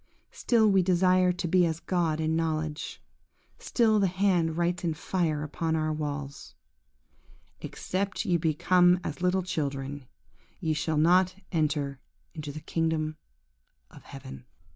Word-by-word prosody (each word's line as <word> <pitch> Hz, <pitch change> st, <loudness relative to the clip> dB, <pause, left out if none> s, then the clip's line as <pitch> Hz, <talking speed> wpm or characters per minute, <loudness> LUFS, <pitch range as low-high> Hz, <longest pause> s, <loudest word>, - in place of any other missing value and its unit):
Still 225 Hz, -3 st, +2 dB
we 195 Hz, -2 st, +4 dB
desire 185 Hz, 0 st, +3 dB
to 175 Hz, -1 st, -3 dB
be 180 Hz, +2 st, +4 dB
as 160 Hz, 0 st, -3 dB
God 170 Hz, -4 st, -1 dB
in 160 Hz, 0 st, 0 dB
knowledge; 155 Hz, -2 st, -2 dB, 0.6 s
still 220 Hz, -3 st, +2 dB
the 195 Hz, -, +3 dB
hand 180 Hz, -3 st, +1 dB
writes 175 Hz, +1 st, 0 dB
in 165 Hz, -2 st, -1 dB
fire 155 Hz, -3 st, -1 dB
upon 160 Hz, +2 st, -2 dB
our 155 Hz, -1 st, 0 dB
walls, 145 Hz, -2 st, -5 dB, 1.1 s
"Except 195 Hz, +2 st, -3 dB
ye 175 Hz, -, +2 dB
become 175 Hz, +3 st, +3 dB
as 160 Hz, +1 st, -5 dB
little 180 Hz, +1 st, +1 dB
children, 140 Hz, -5 st, -4 dB, 0.5 s
ye 160 Hz, -, 0 dB
shall 155 Hz, 0 st, -1 dB
not 180 Hz, +4 st, +4 dB, 0.2 s
enter 145 Hz, -4 st, -1 dB, 0.3 s
into 150 Hz, -3 st, -6 dB
the 155 Hz, +2 st, -8 dB
kingdom 160 Hz, -1 st, -1 dB, 0.7 s
of -, -, -14 dB
Heaven." 65 Hz, -1 st, -10 dB
165 Hz, 135 wpm, -28 LUFS, 155-180 Hz, 1.1 s, we